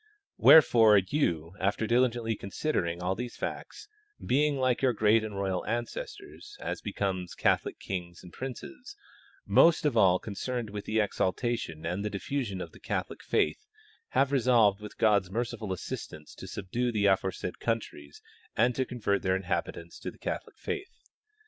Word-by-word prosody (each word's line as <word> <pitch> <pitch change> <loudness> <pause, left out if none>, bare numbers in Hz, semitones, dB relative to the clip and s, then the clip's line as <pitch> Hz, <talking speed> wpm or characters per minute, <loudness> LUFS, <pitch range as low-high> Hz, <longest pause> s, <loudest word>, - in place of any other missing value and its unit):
Wherefore 115 -8 +8
you, 90 - 0
after 100 +3 0
diligently 120 -1 +1
considering 90 - -2
all 90 +1 +1
these 120 +4 -5
facts, - - -6 0.3
being, 145 +3 +1
like 130 -2 +1
your 130 -2 +3
great 110 0 +3
and 105 -2 -5
royal 95 -2 -1
ancestors 410 - -5
(as - - -4
becomes 95 -3 -3
Catholic - - +1
kings 90 -2 -6
and 90 -2 -13
princes), 135 - -8 0.5
most 165 -2 +5
of 145 -5 +2
all 95 -5 +5
concerned 110 +3 -4
with 105 0 -6
the 110 - 0
exaltation 105 -4 -1
and 90 +4 -2
diffusion 105 -2 -3
of - - -7
the - - -16
Catholic - - -4
faith, 430 - 0 0.5
have 135 0 +3
resolved 115 -6 +4
with 105 - -9
God's 100 -4 +3
merci 115 +5 -2
ful 105 -4 -6
assistance 80 -3 -6
to - - -10
subdue 120 +5 -2
the 105 -3 0
aforesaid 95 -2 0
countries 105 -11 -4 0.3
and 120 +3 +4
to 130 +2 -1
convert 105 -6 -1
their 95 0 +1
inhabitants 85 -2 -3
to - - -5
the - - -14
Catholic - - -5
faith. 390 -1 -5
110 Hz, 155 wpm, -29 LUFS, 95-125 Hz, 0.5 s, Wherefore